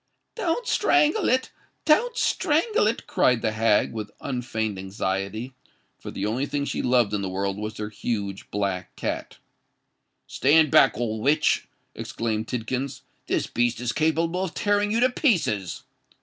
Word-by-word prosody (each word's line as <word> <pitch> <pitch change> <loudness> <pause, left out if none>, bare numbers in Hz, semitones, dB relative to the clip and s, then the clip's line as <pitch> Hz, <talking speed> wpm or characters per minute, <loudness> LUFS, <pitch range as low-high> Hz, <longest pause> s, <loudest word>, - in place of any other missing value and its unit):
"Don't 455 +2 -1
strangle 330 +1 +3
it—don't 310 - 0
strangle 335 - +2
it!" 225 - -1
cried 125 -2 +2
the 110 - +1
hag, 110 -1 +2
with 110 -2 -5
unfeigned 110 -6 -3
anxiety—for 100 +6 -5
the - - -4
only 120 +7 -1
thing 145 -1 -2
she - - -2
loved 120 -4 +2
in 105 - 0
the 95 - -3
world 95 +1 -2
was 105 +1 -5
her 105 0 -4
huge 100 -3 -4
black 100 -3 -3
cat. - - -4 0.9
"Stand 150 +2 +3
back, - - +5
old 110 -2 -2
witch!" 150 +5 +2 0.3
exclaimed 110 -1 -3
Tidkins: 125 +3 -3 0.3
"this - - 0
beast 120 0 0
is 120 -1 -1
capable 165 +5 0
of 185 - -5
tearing 205 0 +1
you 230 +2 +1
to 255 - +5
pieces." 135 - 0
125 Hz, 145 wpm, -25 LUFS, 105-175 Hz, 0.9 s, back